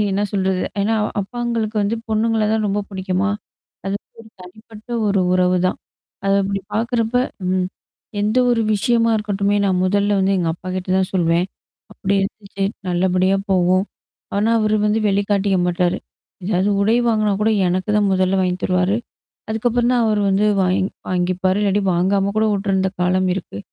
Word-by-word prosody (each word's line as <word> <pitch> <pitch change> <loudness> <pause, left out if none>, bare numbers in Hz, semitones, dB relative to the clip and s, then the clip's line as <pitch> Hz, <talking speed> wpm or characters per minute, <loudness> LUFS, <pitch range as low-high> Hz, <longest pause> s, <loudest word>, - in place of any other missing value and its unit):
அது 205 -1 +1
என்ன 205 +2 0
சொல்றது? 190 -2 0 0.2
ஏன்னா 225 +2 +1 0.3
அப்பாங்களுக்கு 230 0 -3
வந்து 215 +3 0
பொண்ணுங்கள 220 0 +1
தான் 215 -1 0
ரொம்ப 205 +1 0
புடிக்குமா? 190 +1 -1 0.6
அது 195 +1 -1 0.2
ஒரு 220 - -15
தனிப்பட்ட 215 +4 -14 0.2
ஒரு 195 -1 +2
உறவுதான். 180 0 +2 0.5
அத 195 - +2
அப்பிடி 195 0 -2
பாக்குறப்ப 230 +1 0 0.4
ம். 185 -1 +1 0.5
எந்த 215 +4 +1
ஒரு 230 -2 +2
விஷயமா 230 +2 +2
இருக்கட்டுமே. 205 -1 0
நான் 185 -2 +1
முதல்ல 200 +1 +2
வந்து 190 +1 +2
எங்க 170 -2 0
அப்பகிட்ட 185 +1 -6
தான் 185 - 0
சொல்வேன். 170 0 +2 0.5
அப்பிடி 195 +1 -1
இருந்துச்சு. 195 -1 -4 0.2
நல்லபடியா 185 +2 +2
போவோம். 185 +1 +3 0.5
ஆனா 210 +3 +2
அவரு 215 0 +2
வந்து 210 +1 +2
வெளிகாட்டிக்க 200 -1 +1
மாட்டாரு. 175 0 0 0.5
எதாவது 190 +1 +1
உடை 220 +3 +3
வாங்குனா 215 -2 +2
கூட 220 - +3 0.2
எனக்கு 185 +4 -1
தான் 205 -1 +2
முதல்ல 185 +1 +2
வாங்கி 180 -1 0
தருவாரு. 185 +2 +1 0.5
அதுக்கப்புறம் 240 +2 +1
தான் 240 -2 +2
அவர் 210 -1 +1
வந்து 195 +2 +2 0.2
வாங் 185 +1 +1 0.2
வாங்கிப்பாரு. 185 +1 0
இல்லாட்டி 200 0 +1
வாங்காம 195 +3 +1
கூட 220 - +3
விட்டுருந்த 195 -1 0
காலம் 185 +1 +2
இருக்கு. 170 - -6
195 Hz, 150 wpm, -20 LUFS, 185-215 Hz, 0.6 s, போவோம்